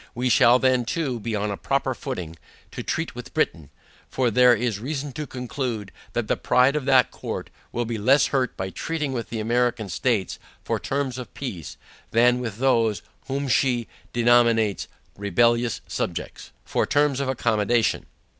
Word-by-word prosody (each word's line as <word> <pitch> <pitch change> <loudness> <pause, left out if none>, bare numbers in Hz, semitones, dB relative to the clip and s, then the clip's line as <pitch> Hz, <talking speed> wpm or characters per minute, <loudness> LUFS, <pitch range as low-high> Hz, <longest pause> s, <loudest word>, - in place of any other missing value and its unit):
We 125 +1 0
shall 120 +1 +6
then 130 -1 +2
too, 135 -2 -2
be 115 0 -3
on 105 0 -1
a 100 - -4
proper - - 0
footing, 85 -2 -6 0.4
to - - -6
treat - - -2
with - - -10
Britain; 75 -5 0 0.4
for 125 -3 +1
there 125 +1 +6
is 115 -2 -1
reason 140 +3 -4
to 150 +2 -5
conclude, 125 -5 -4 0.2
that - - -1
the - - +2
pride 130 +3 +3
of 150 -3 -1
that 130 -2 +4
court, - - -6 0.2
will 120 - -2
be 115 -1 -3
less 135 +7 +4
hurt 130 -3 0
by 95 0 -3
treating 150 - -3
with 120 -3 -4
the 115 - -4
American 120 -1 0
states 105 +1 -1 0.2
for - - -1
terms 135 -2 -2
of 120 -5 -8
peace, 95 - -6 0.3
than 120 +2 +4
with 115 -5 -4
those, 115 -5 +2 0.2
whom 140 +1 -2
she 120 -2 +1 0.2
denominates, 115 -3 +3 0.3
"rebellious 115 +3 +1
subjects," - - -4 0.2
for - - 0
terms 145 -2 +2
of 140 -1 -1
accommodation. 115 -2 +1
120 Hz, 165 wpm, -24 LUFS, 110-130 Hz, 0.4 s, shall